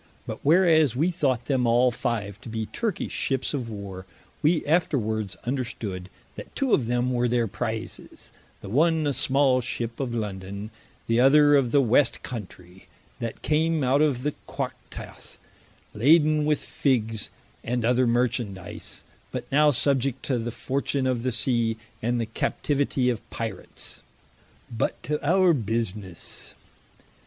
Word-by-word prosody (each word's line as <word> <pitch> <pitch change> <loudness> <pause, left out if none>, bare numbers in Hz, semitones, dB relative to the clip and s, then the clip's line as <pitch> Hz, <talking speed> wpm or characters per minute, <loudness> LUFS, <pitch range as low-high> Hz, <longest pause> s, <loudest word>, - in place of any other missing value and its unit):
But - - -5
whereas 160 -4 +4
we 160 +8 +2
thought 135 -8 0
them 130 -4 +1
all 120 +2 +4
five 110 -5 -3
to - - -9
be 110 0 -3
Turkish 220 - -3
ships 135 +1 -1
of 125 -5 -3
war, 100 -3 -7 0.3
we 155 +1 +2
afterwards 110 - 0
understood, 115 -8 -3 0.3
that - - -10
two 270 -4 +1
of 120 - +3
them 125 +1 +1
were 120 0 +2
their 120 -1 +2
prizes, 110 +1 -6 0.3
the 100 - -8
one 160 - +3
a 145 - +2
smal 135 0 +3
ship 115 -1 -4
of 130 -3 -2
London, 100 -2 -4 0.3
the 115 +1 +2
other 145 +3 +6
of 130 -4 +3
the 140 - +5
West 125 +4 +3
countrey, 95 -5 -9 0.3
that 115 -1 -5
came 160 0 +2
out 130 +3 +3
of 140 -5 +2
the 150 0 0
Quactath - - -7 0.6
laden 150 +5 +4
with 150 -1 +3
figges, 115 -6 0 0.3
and 120 -1 -1
other 125 +1 +3
Merchandise, 115 -6 -2 0.3
but - - -4
now 150 +2 +5
subiect 135 -1 +1
to 130 -4 0
the 115 +1 -3
fortune 135 +3 -2
of 130 -2 0
the 130 +1 0
Sea, 115 -1 +1 0.2
and 120 +1 0
the 115 - 0
captivity 135 +3 0
of 115 - -4
Pirats. 110 -5 -5 0.7
But 110 - -1
to 150 0 -2
our 180 +3 +4
businesse. 110 - -4
125 Hz, 145 wpm, -26 LUFS, 115-145 Hz, 0.7 s, other